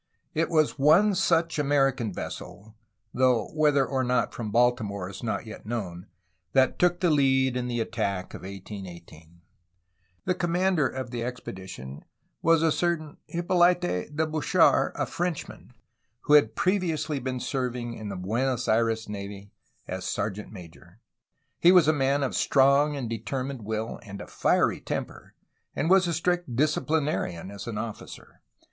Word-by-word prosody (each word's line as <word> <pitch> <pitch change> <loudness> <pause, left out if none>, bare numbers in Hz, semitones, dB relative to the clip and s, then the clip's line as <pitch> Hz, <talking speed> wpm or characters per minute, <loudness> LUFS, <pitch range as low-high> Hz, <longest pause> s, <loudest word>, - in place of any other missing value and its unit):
It 165 +1 0
was 155 -3 +2
one 170 +9 +5
such 170 -4 +1
American 135 -5 +1
vessel, 105 +3 -8 0.4
though 125 -3 +2
whether 150 -3 +3
or 130 0 -1
not 125 0 0
from 110 -3 -5
Baltimore 110 -4 +1
is 95 - -9
not 115 - -3
yet 110 - -9
known, 95 -7 -4 0.5
that 130 -1 +3
took 175 0 +2
the 175 -3 +3
lead 130 -3 +3
in 125 -1 -2
the 120 -1 -2
attack 105 -5 -2
of - - -8
1818. 90 -4 -10 0.8
The 185 - +2
commander 175 -3 +1
of 130 -2 -6
the 120 -2 -3
expedition 95 - -7 0.4
was 165 -1 +4
a 165 - +3
certain 160 -2 -1
Hippolyte 175 +1 +3
de 120 - -2 0.2
Bouchard, 155 -4 +3
a - - -1
Frenchman, 175 -3 -4 0.5
who 150 - +1
had 145 -7 +5
previously 170 -6 0
been 130 0 -3
serv 125 -1 -2
ing 120 -1 -4
in 110 -2 -7
the 100 - -5
Buenos 120 +7 -1
Aires 115 0 +1
navy 100 0 -7 0.4
as 95 0 -5
sergeant> 105 +2 -3
major. 90 0 -13 0.6
He 175 - +7
was 180 -4 +6
a 155 - +5
man 140 0 +1
of 135 - -1
strong 140 +2 +3
and 135 -4 -3
determined 130 +3 -4
will 110 +1 -3
and 100 -3 -9
a - - -7
fiery - - +1
temper - - -6 0.4
and 160 +5 0
was 190 -1 +5
a 170 - 0
strict 175 -5 -1
disciplinarian 150 - 0
as 100 +4 -8
an 115 -3 -4
officer. 110 -1 -8
130 Hz, 155 wpm, -27 LUFS, 105-155 Hz, 0.8 s, He